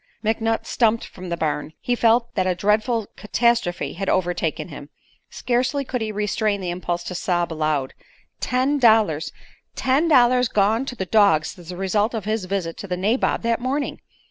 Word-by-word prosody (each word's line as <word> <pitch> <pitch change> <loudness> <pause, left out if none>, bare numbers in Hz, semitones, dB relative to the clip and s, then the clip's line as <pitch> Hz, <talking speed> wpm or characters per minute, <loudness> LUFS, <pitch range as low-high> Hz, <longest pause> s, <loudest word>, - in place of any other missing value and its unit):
McNutt 225 +1 0
stumped 230 -1 +1
from 185 -1 -10
the 170 - -2
barn. 155 -1 -2
He 245 - -1
felt 235 0 +2
that 185 - 0
a 180 - +1
dreadful 215 +4 +1
catastrophe 235 -4 0
had 195 +2 -3
overtaken 175 -2 -1
him. 145 -1 -10 0.4
Scarcely 255 +3 -1
could 250 -1 -3
he 220 -1 -2
restrain 210 0 -1
the 180 -2 -3
impulse 175 -1 -3
to 180 - -6
sob 175 -2 -1
aloud. 155 -4 -1 0.5
Ten 260 +3 +1
dollars! 220 - +3 0.4
Ten 270 +6 +2
dollars 250 -4 +5
gone 220 +4 +1
to 250 - -5
the 190 - -3
dogs 190 -4 +3
as 175 -1 -12
the 180 - -6
result 205 +4 0
of 215 - -4
his 215 -2 -1
visit 185 -3 -3
to 200 - -7
the 180 -1 -2
nabob 215 +8 0
that 230 0 0
morning! 275 +3 -2
210 Hz, 175 wpm, -22 LUFS, 180-235 Hz, 0.5 s, dollars